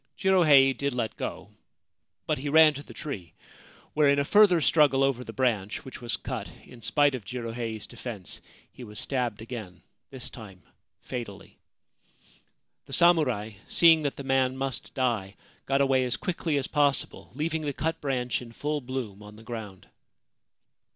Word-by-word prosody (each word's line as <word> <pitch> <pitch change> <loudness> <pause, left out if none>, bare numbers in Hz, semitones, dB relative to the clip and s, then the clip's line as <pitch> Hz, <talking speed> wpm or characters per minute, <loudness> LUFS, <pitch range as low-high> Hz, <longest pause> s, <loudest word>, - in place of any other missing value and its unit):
Jirohei 155 -9 +5
did 140 0 -2
let 115 -3 -2
go; - - -6 0.7
but - - 0
he 145 +2 -3
ran 155 0 +7
to 145 - -7
the - - -14
tree, 95 - -7 0.6
where 150 -1 +4
in 140 - +4
a 140 - +1
further 205 -1 +6
struggle 145 -3 +4
over 135 -2 +1
the - - -8
branch, 110 -6 -1
which 130 - -9
was 120 - -1
cut - - -5 0.2
in 120 - -14
spite 145 +5 +3
of 125 -4 -5
Jirohei's 115 -1 -5
defence, 115 -6 -7 0.3
he 125 - -11
was 105 -2 -6
stabbed 125 -4 -1
again, 110 -7 -8 0.3
this 130 -2 -7
time 95 -7 -12 0.4
fatally. 115 -6 -7 1.3
The - - -8
samurai, 135 -12 +3 0.2
seeing 165 -2 +6
that 145 -2 -2
the 140 - -7
man 130 -1 +1
must 135 -1 -4
die, 115 -7 -1 0.3
got 135 +1 +2
away 135 -1 +3
as 120 -1 -2
quickly 165 -4 -1
as 135 - -1
possible, 145 -2 0
leaving 160 +2 -1
the 145 -2 -2
cut 160 +4 -3
branch 125 -5 -1
in 115 -1 -11
full 150 +3 -2
bloom 125 -6 -5
on 105 0 -12
the 110 - -14
ground. 110 -5 -8
130 Hz, 165 wpm, -27 LUFS, 115-145 Hz, 1.3 s, ran